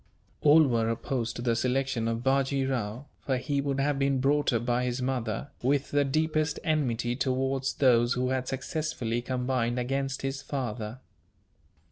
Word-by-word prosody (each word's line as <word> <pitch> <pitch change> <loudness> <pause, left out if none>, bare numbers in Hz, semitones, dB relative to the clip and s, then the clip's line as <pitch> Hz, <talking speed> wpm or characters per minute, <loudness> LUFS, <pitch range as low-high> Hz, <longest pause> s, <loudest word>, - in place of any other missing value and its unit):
All 155 +2 +7
were 115 -5 +1
opposed 115 0 -2
to 120 - -5
the 120 -2 +2
selection 125 -1 0
of 115 +1 -2
Bajee 135 0 +2
Rao; 120 0 -3
for 130 -2 -1
he 140 +2 -1
would 140 -1 -1
have 140 0 +1
been 135 -1 +2
brought 145 +3 +2
up 115 -1 0
by 120 0 +1
his 125 0 -1
mother, 125 -1 -2
with 140 +2 +1
the 145 0 +3
deepest 155 +1 0
enmity 125 -6 0
towards 135 +1 0
those 120 -2 +4
who 125 0 0
had 130 -1 -1
successfully 130 -4 -2
combined 125 -1 -1
against 135 +2 -2
his 135 0 -2
father. 120 -4 -4
130 Hz, 160 wpm, -28 LUFS, 120-140 Hz, -, All